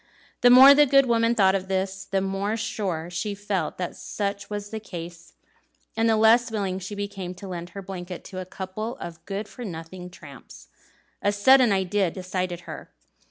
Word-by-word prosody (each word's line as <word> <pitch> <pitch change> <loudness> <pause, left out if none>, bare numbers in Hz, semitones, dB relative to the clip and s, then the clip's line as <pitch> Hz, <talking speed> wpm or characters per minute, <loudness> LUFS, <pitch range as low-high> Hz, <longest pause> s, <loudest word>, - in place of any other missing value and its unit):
The 245 - +7
more 260 +3 +10
the 295 +1 +5
good 275 +1 +5
woman 230 -1 +2
thought 190 -3 +4
of 190 -1 -2
this, 190 +1 -2
the 195 -1 -1
more 195 +3 -2
sure 180 -6 -3
she 205 +3 -3
felt 200 -1 -3
that 180 -1 -4
such 200 -1 -4
was 205 -1 -5
the 220 - -4
case, 170 -4 -9 0.6
and 225 0 +2
the 220 - +3
less 230 +2 +5
willing 195 -4 -2
she 195 +3 -7
became 200 -3 -5
to 195 +2 -10
lend 175 -1 -6
her 195 - -6
blanket 180 -1 -7
to 185 -2 -8
"a 185 - -5
couple 190 +5 -6
of 170 -1 -9
good 200 +1 -4
for 245 - -10
nothing 180 -1 -8
tramps." 140 - -14 0.5
A 205 - +2
sudden 250 +3 +5
idea 190 0 +1
decided 185 -1 -4
her. - - -9
195 Hz, 185 wpm, -25 LUFS, 180-215 Hz, 0.6 s, more